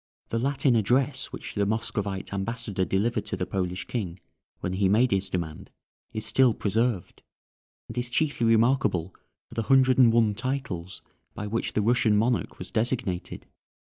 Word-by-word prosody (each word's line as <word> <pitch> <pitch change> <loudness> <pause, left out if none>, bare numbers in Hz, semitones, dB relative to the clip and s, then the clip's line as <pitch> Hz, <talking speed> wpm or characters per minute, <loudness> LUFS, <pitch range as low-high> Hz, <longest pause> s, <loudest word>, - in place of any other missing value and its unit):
The 115 - -1
Latin 135 0 +2
address 130 +5 +1
which - - -8
the 100 -1 0
Moscovite 100 -3 -2
ambassador 100 -1 -2
delivered 105 +4 0
to 100 - -3
the 90 - -1
Polish 90 -1 -3
King 95 -7 -4 0.4
when 90 - -3
he 95 0 +2
made 120 +5 +3
his 95 0 0
demand 85 -4 -4 0.4
is 110 - -4
still 120 +1 +3
preserved, 110 -2 -1 0.7
and - - -9
is 120 0 -2
chiefly 140 -3 +1
remarkable 115 -7 +2 0.3
for - - -15
the 115 - -1
hundred 130 -1 +5
and 120 -3 +7
one 115 -2 +3
titles 105 -8 -4 0.3
by 105 - -4
which 110 +3 -2
the 105 - +1
Russian 115 -2 +3
monarch 115 +3 0
was - - -8
designated. 115 -5 -2
110 Hz, 160 wpm, -26 LUFS, 95-125 Hz, 0.7 s, and